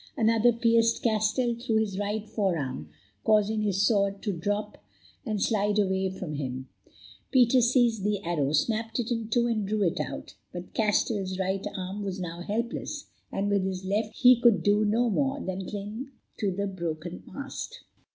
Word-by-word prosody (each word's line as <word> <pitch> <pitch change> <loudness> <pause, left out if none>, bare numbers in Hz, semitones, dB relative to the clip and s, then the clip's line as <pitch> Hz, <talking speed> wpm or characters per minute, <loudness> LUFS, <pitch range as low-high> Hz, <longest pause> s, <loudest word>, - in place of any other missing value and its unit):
Another 225 +1 +4
pierced 230 0 +2
Castell 225 +2 +2
through 235 -1 -2
his 210 -3 0
right 210 +1 -2
forearm, 170 - -2 0.3
causing 215 0 +3
his 200 -1 +2
sword 200 -2 +1
to 205 - -1
drop 205 +5 -3 0.4
and 215 -2 -1
slide 210 -1 +1
away 190 -2 +1
from 185 -4 -6
him. 130 -2 -4 0.6
Peter 255 -1 +5
seized 235 -3 +3
the 205 0 +1
arrow, 150 -5 0
snapped 225 +9 0
it 240 0 -2
in 230 -2 -1
two, 235 +1 +2
and 220 -4 0
drew 210 0 +1
it 170 - 0
out; - - -5 0.2
but 180 0 -8
Castell's 205 -3 +1
right 190 +1 -1
arm 190 +2 -4
was 195 -2 -4
now 175 -1 -5
helpless, 230 +6 -3 0.2
and 195 +1 -1
with 200 -2 +2
his 190 0 -3
left 210 +3 -1
he 250 -2 +6
could 235 -4 +5
do 205 +1 +4
no 225 +4 +2
more 270 +5 0
than 190 -5 -4
cling 210 +6 -5 0.3
to 205 - +1
the 195 +2 -2
broken 170 -3 -4
mast. 280 0 -6
205 Hz, 170 wpm, -28 LUFS, 190-230 Hz, 0.6 s, he